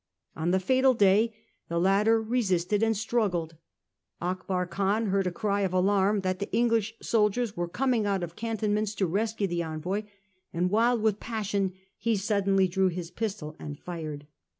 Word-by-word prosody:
On 160 +2 -1
the 190 +1 +3
fatal 260 +6 +3
day 210 +2 +4 0.4
the 170 - -1
latter 205 +5 +4
resisted 210 -4 0
and 225 -1 +2
struggled; 195 -7 -1 0.6
Akbar 180 +1 -2
Khan 200 +4 0
heard 195 -1 +1
a - - -1
cry 200 +1 -1
of 190 -2 0
alarm 195 +2 +2
that 185 0 -1
the 200 - -4
English 225 -1 +1
soldiers 220 0 +1
were 175 0 -2
coming 230 +3 0
out 195 -3 0
of 170 0 -6
cantonments 215 -2 -1
to 195 - +1
rescue 210 +4 -1
the 175 -2 -1
envoy; 170 +6 -3 0.5
and, 180 +2 0
wild 230 +1 +3
with 215 -2 +2
passion, 205 -4 -2 0.3
he 230 +1 +1
suddenly 195 -1 +2
drew 190 +1 +2
his 175 -1 -4
pistol 200 -8 -4
and 145 -1 -7
fired. 155 -4 -6
200 Hz, 165 wpm, -28 LUFS, 180-220 Hz, 0.6 s, day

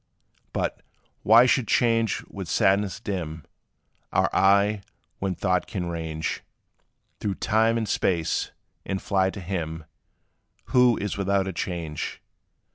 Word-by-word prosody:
But, - - -2 0.4
why 115 +3 +7
should 130 -2 +2
change 115 -1 +2
with - - -8
sadness 100 +1 +2
dim 85 -8 -4 0.7
Our - - +2
eye, 100 +1 +4 0.4
when 95 -2 -1
thought 90 -1 0
can 90 -4 -3
range 80 -2 -3 0.8
Through 100 -2 -2
time 110 +3 +2
and 110 -2 -1
space, 85 -4 0 0.3
and 95 - -3
fly 95 -1 +1
to 100 - -7
him, 80 -4 -4 0.9
Who 125 -2 +5
is 105 0 -3
without 100 0 +1
a 95 - -3
change? 85 -4 -4
95 Hz, 120 wpm, -25 LUFS, 85-105 Hz, 0.9 s, why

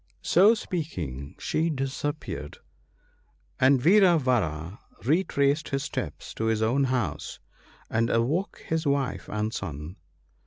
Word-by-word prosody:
" - - -40
So 200 +6 +7
speaking, 85 - -5
she 160 +2 0
disappeared, 135 - -4 1.0
and 130 +1 +5
Vira 180 +4 +6
vara 95 - -1 0.3
retraced 145 -1 +2
his 135 0 -1
steps - - -5
to 110 - -3
his 110 -1 +1
own 135 +5 +2
house 120 - -2 0.5
and 115 +1 +1
awoke 145 - 0
his 160 -1 -1
wife 140 -2 -1
and 105 +1 -2
son. 80 0 -6
130 Hz, 120 wpm, -27 LUFS, 105-155 Hz, 1.0 s, So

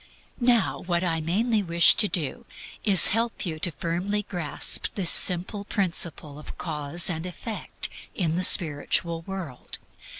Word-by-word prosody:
Now 240 -2 +1
what 175 0 -2
I 165 -3 -1
mainly 210 +7 0
wish 170 -2 +5
to 210 - +6
do 160 -8 -3 0.4
is 195 -6 +6
to - - 0
help 230 +1 -1
you 160 -3 -5
firmly 175 +5 -2
to - - -36
grasp 175 -6 -2
this 185 -4 +2
simple 185 +3 +1
principle 170 -7 0
of - - -11
Cause 155 0 -2
and 165 -3 -2
Effect 195 +5 -4 0.3
in 165 -4 0
the 180 - -1
spiritual 165 +1 +1
world. 185 -10 -8
175 Hz, 145 wpm, -25 LUFS, 165-200 Hz, 0.4 s, to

